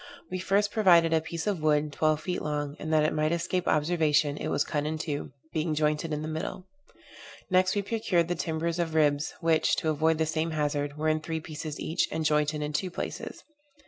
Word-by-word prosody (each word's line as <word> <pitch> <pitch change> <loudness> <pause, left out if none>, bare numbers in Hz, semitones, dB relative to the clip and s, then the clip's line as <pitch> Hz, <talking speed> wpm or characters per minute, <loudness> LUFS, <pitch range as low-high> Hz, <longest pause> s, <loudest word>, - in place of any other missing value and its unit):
We 185 - -2
first 200 +2 +1
provided 170 -6 +5
a 160 - +3
piece 165 0 -5
of 200 -6 -1
wood, 150 -1 +2
twelve 155 +1 +1
feet 180 - -3
long, 145 -1 -3
and, 155 - -4
that 155 -1 +4
it 155 - +1
might 155 0 +1
escape 175 +1 -1
observation, 150 -2 +2
it - - -4
was - - +1
cut 150 0 -2
in 155 +1 -2
two, 150 -4 -4 0.2
being 155 0 0
jointed 150 +1 0
in 150 0 -2
the - - -4
middle. 160 +3 -4 0.9
Next 185 +1 +3
we 205 - 0
procured 205 -6 +1
the 175 - 0
timbers 165 0 -2
of 165 -2 -1
ribs, 150 -1 +2
which, 160 -1 +3
to 160 - -1
avoid 160 +1 +2
the 160 - +1
same 155 +1 -1
hazard, 145 -1 -1
were 155 +1 -1
in 155 0 +2
three 160 +1 -3
pieces 155 -1 -6
each, 165 +3 0
and 160 -1 -2
jointed 150 0 +1
in 150 0 -4
two 185 +5 -1
places. - - -6
155 Hz, 210 wpm, -28 LUFS, 150-170 Hz, 0.9 s, provided